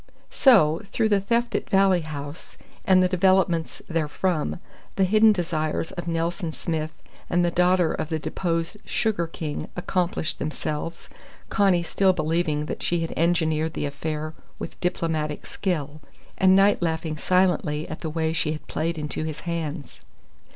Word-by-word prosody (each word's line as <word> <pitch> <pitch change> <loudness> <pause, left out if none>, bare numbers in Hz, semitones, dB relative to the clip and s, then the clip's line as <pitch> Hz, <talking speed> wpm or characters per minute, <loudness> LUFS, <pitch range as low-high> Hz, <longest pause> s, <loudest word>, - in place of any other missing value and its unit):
So, 175 - +5
through 225 -2 +1
the 205 -2 +4
theft 235 +4 0
at - - -2
Valley 195 -3 +4
House 145 0 -8 0.3
and 185 -1 +5
the - - +4
developments 185 -2 +2
therefrom, 165 +1 -1 0.4
the 195 - +2
hidden 215 +3 +6
desires 165 -4 -1
of 175 0 -6
Nelson 165 0 -1
Smith 155 -2 -4 0.3
and 175 0 +2
the 175 - +1
daughter 180 -1 +3
of 155 - -3
the 160 - 0
deposed 165 +3 -2
Sugar 205 -7 0
King 155 -2 -5
accomplished 175 -3 -1
themselves, 155 +2 -4 0.4
Connie 195 -4 +3
still 190 +2 +2
believing 155 -2 0
that - - -5
she 175 -1 0
had 165 - -3
engineered 160 -1 +1
the - - -2
affair 155 +2 -4 0.2
with - - -8
diplomatic 160 -4 -1
skill, 155 -5 -3 0.3
and 190 0 +5
Knight 195 +1 +4
laughing 160 -2 -1
silently 180 -3 +1
at 155 - -6
the 160 - -3
way 160 0 -1
she 155 -1 0
had 155 - -8
played 165 +2 -2
into 150 0 -3
his 155 -1 -5
hands. 160 -4 -5
165 Hz, 150 wpm, -25 LUFS, 155-185 Hz, 0.4 s, hidden